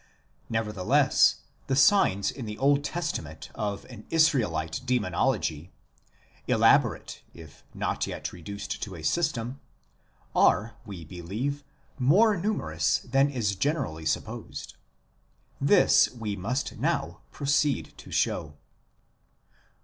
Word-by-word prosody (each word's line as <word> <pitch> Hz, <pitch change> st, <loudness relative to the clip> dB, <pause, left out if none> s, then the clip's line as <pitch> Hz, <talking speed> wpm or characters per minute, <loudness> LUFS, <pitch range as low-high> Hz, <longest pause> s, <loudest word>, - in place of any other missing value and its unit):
Nevertheless, 105 Hz, -5 st, +2 dB, 0.3 s
the 135 Hz, -, +1 dB
signs 135 Hz, -, +4 dB
in 125 Hz, -5 st, -7 dB
the 105 Hz, 0 st, -6 dB
Old 140 Hz, +1 st, +3 dB
Testament 145 Hz, -, -4 dB
of 100 Hz, -2 st, -4 dB
an 115 Hz, -4 st, -12 dB
Israelite 115 Hz, -, +1 dB
Demonology, 105 Hz, -, 0 dB, 0.8 s
elaborate -, -, +3 dB
if 80 Hz, -3 st, -14 dB
not -, -, -1 dB
yet -, -, -5 dB
reduced 100 Hz, +4 st, -6 dB
to 95 Hz, -3 st, -5 dB
a 80 Hz, -, -9 dB
system, 125 Hz, -, -1 dB, 0.8 s
are, 110 Hz, +1 st, +3 dB
we 90 Hz, -5 st, -8 dB
believe, 105 Hz, -, -4 dB, 0.4 s
more 200 Hz, -, +5 dB
numerous 85 Hz, -, 0 dB
than 135 Hz, +3 st, +3 dB
is 115 Hz, -7 st, -1 dB
generally 95 Hz, -, -2 dB
supposed. -, -, -4 dB, 0.9 s
This -, -, +5 dB
we 110 Hz, -4 st, -5 dB
must 120 Hz, +8 st, -3 dB
now -, -, -1 dB
proceed 145 Hz, 0 st, 0 dB
to -, -, -12 dB
show. 75 Hz, -4 st, -1 dB
110 Hz, 105 wpm, -27 LUFS, 90-140 Hz, 0.9 s, more